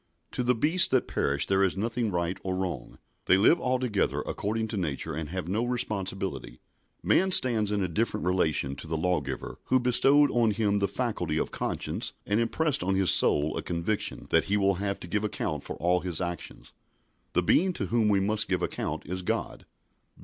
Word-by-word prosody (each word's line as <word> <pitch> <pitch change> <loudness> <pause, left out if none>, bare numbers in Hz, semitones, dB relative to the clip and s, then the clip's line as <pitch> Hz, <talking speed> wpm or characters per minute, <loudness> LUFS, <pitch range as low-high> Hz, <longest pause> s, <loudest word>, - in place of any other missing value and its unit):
To - - -3
the 125 0 +2
beasts 160 +10 +5
that 130 -2 +1
perish 70 +1 0
there 95 0 +2
is 95 -1 0
nothing 115 +2 -1
right 85 -1 -2
or 95 -1 -3
wrong. 95 -1 -5 0.3
They 95 - +4
live 115 - +4
altogether 125 -5 0
according 110 +2 -3
to - - -4
nature, 80 -2 -3
and 80 0 -5
have 90 -1 -5
no 105 +6 -1
responsibility. 95 - -4 0.4
Man 190 - +3
stands 115 - +4
in 105 -2 0
a - - 0
different 100 +3 -2
relation 80 -7 0
to - - -8
the 80 0 -2
Lawgiver 75 -6 -3
who 130 - +2
bestowed 135 +4 +4
on 120 -2 +2
him 105 -2 0
the 100 - +1
faculty 100 -7 -3
of - - -2
conscience - - -3
and 105 +2 0
impressed 140 +5 0
on 95 +2 0
his 95 -1 +3
soul 75 +1 +4
a - - -3
conviction 85 +5 -1
that - - +3
he 105 - +1
will 100 -1 +2
have 100 -1 -2
to - - -8
give 105 +4 -1
account 75 -8 -3
for - - -6
all 90 +2 +1
his 90 -3 -3
actions. 85 -2 -6 0.6
The 90 - +2
Being 185 - +3
to 100 - -3
whom 110 +2 +1
he 100 - +3
must 105 +2 0
give - - 0
account - - -4
is 90 +3 -3
God. 90 - -4
100 Hz, 195 wpm, -27 LUFS, 90-115 Hz, 0.6 s, beasts